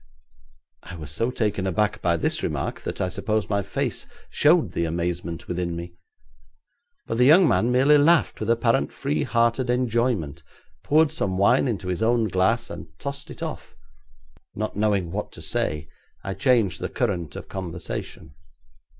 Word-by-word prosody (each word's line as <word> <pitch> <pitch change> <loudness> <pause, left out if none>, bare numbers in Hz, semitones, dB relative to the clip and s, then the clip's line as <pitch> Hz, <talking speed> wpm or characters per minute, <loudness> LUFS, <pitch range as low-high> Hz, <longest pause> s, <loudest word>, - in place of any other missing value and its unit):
I 90 - -10
was 75 -3 -7
so 115 +11 0
taken 105 -6 -1
aback 105 +3 0
by 85 -1 +2
this - - 0
remark - - -3
that - - -5
I 95 - 0
suppose 105 +4 -2
my 100 0 +2
face - - -3 0.2
showed 150 - +3
the 85 - -1
amazement 85 0 -3
within 90 -1 -2
me. 85 +1 -7 1.1
But 115 - -3
the 125 - +6
young 165 +6 +7
man 120 -3 +2
merely 135 +4 +5
laughed 165 +2 +3
with - - -3
apparently 115 - +1
free 75 0 -1
hearted 115 - +1
enjoyment, 115 - 0 0.4
poured 155 +1 +3
some 95 -1 -1
wine 110 +8 +4
into 105 -6 -3
his 90 +1 -2
own 115 -1 +2
glass, 110 +6 +1
and 85 -1 -8
tossed 140 +4 -5
it - - -8
off. - - -7 0.8
Not 110 +1 -3
knowing 100 -5 +1
what 105 +3 -4
to - - -10
say, 75 0 -2 0.4
I 95 - -3
changed 105 -1 +2
the - - -2
current 85 -7 -2
of - - -8
conversation. 85 -3 -6
100 Hz, 160 wpm, -24 LUFS, 85-120 Hz, 1.1 s, young